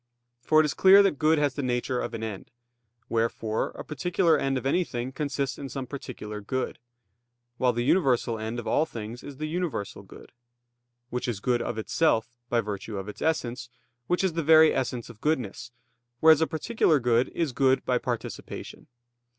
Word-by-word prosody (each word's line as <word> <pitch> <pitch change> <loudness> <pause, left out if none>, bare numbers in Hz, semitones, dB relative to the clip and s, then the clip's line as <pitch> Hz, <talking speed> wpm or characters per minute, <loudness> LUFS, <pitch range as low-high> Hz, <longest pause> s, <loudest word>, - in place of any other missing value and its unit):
For 155 +5 +4
it - - +1
is 150 - -1
clear 195 +1 +7
that 190 -8 +1
good 155 +1 +4
has 145 -3 +1
the 145 - -3
nature 125 0 -1
of - - -4
an 110 - -5
end; 105 -4 -6 0.6
wherefore, 115 -1 -1
a - - -7
particular 170 +2 +1
end 135 -1 0
of 130 - -5
anything 135 -5 -1
consists 140 -2 -3
in 140 -1 -6
some 135 -1 -5
particular 120 -5 -7
good; 130 +6 -3 0.8
while 125 -1 +3
the 120 0 -2
universal 125 -8 +2
end 110 +2 -4
of 120 - -5
all 160 - +2
things 115 -3 -7
is 140 -2 -10
the 155 - -3
Universal 165 - -3
Good; - - -14 0.8
Which 125 0 -2
is 115 -5 -2
good 120 +3 +1
of - - -3
Itself 115 0 +1 0.2
by 120 -1 +2
virtue 105 0 -5
of 95 0 -5
Its 105 - -9
Essence, 125 -6 -1 0.4
Which 180 +2 +1
is 190 -3 +1
the 165 - -1
very 160 0 +6
essence 125 -3 -2
of 110 - -19
goodness; 125 -7 -2 0.5
whereas 160 0 +6
a 160 - +3
particular 160 -2 +1
good 120 0 +2
is 165 -5 0
good 130 +1 +2
by 125 -1 +1
participation. 120 -2 -6
130 Hz, 185 wpm, -27 LUFS, 115-155 Hz, 0.8 s, clear